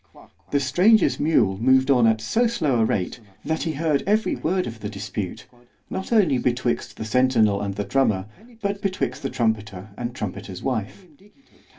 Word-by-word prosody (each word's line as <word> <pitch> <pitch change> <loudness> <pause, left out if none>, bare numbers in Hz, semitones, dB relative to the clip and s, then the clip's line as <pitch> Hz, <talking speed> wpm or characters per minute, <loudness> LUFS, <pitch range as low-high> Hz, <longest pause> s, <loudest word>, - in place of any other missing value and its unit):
The 145 - +2
stranger's 180 - +3
mule 110 -11 +2
moved 130 +3 +4
on 125 -4 +5
at 110 -1 +2
so 230 - +1
slow 155 - 0
a 110 - +4
rate, 95 +2 -2 0.3
that 160 0 -1
he 160 - -2
heard 150 -1 0
every 215 +2 +2
word 180 +3 -1
of 115 -1 -7
the 105 - -5
dispute, 100 -2 -5 0.5
not 190 +3 -4
only 180 - +4
betwixt 120 0 -1
the 110 - -5
centinel 110 -4 +2
and 100 -1 -3
the 105 - -2
drummer, 110 -9 +1 0.4
but 200 0 -2
betwixt 170 -9 -2
the - - -2
trumpeter 110 -4 -2
and 120 0 -4
trumpeter's 95 -4 -6
wife. 130 - -3
125 Hz, 170 wpm, -23 LUFS, 110-160 Hz, 0.5 s, on